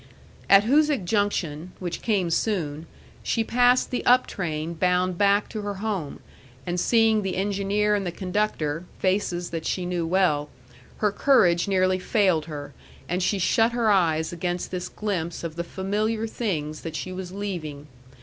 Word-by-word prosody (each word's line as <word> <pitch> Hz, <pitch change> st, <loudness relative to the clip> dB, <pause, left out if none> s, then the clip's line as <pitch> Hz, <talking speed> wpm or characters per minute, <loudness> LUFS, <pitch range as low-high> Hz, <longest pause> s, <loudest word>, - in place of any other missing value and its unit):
At 195 Hz, 0 st, +8 dB
Hoosic 285 Hz, -2 st, +2 dB
Junction, 180 Hz, -5 st, -1 dB
which 175 Hz, -2 st, -5 dB
came 195 Hz, -7 st, 0 dB
soon, 165 Hz, -5 st, -1 dB, 0.3 s
she 230 Hz, -, 0 dB
passed 245 Hz, +2 st, +3 dB
the 250 Hz, -, -2 dB
up 250 Hz, +1 st, +5 dB
train 160 Hz, -3 st, -4 dB
bound 180 Hz, +1 st, +1 dB
back 200 Hz, +2 st, +3 dB
to 215 Hz, -, -5 dB
her 205 Hz, 0 st, -4 dB
home, 195 Hz, -7 st, -4 dB, 0.4 s
and 175 Hz, 0 st, -2 dB
seeing 225 Hz, +1 st, +3 dB
the 190 Hz, -2 st, -3 dB
engineer 200 Hz, +2 st, 0 dB
and 205 Hz, -1 st, +1 dB
the 175 Hz, -, -3 dB
conductor, 180 Hz, -4 st, -2 dB
faces 185 Hz, -2 st, -1 dB
that 165 Hz, -1 st, -4 dB
she 180 Hz, +1 st, -2 dB
knew 175 Hz, -2 st, -2 dB
well, 165 Hz, -5 st, +2 dB, 0.5 s
her 210 Hz, -1 st, +1 dB
courage 190 Hz, -8 st, +3 dB
nearly 185 Hz, -1 st, +2 dB
failed 185 Hz, -5 st, +2 dB
her, 145 Hz, -3 st, -7 dB, 0.3 s
and 180 Hz, +1 st, -1 dB
she 200 Hz, +3 st, +1 dB
shut 225 Hz, +5 st, +2 dB
her 230 Hz, -3 st, +2 dB
eyes 160 Hz, -4 st, +2 dB
against 175 Hz, +1 st, -3 dB
this 180 Hz, -1 st, -4 dB
glimpse 180 Hz, -7 st, -3 dB
of 165 Hz, -2 st, -5 dB
the 170 Hz, -, -3 dB
familiar 210 Hz, +5 st, -2 dB
things 160 Hz, -10 st, -3 dB
that 165 Hz, -1 st, -6 dB
she 185 Hz, -, -4 dB
was 185 Hz, -1 st, -6 dB
leaving. 175 Hz, -8 st, -5 dB
185 Hz, 160 wpm, -25 LUFS, 170-210 Hz, 0.5 s, At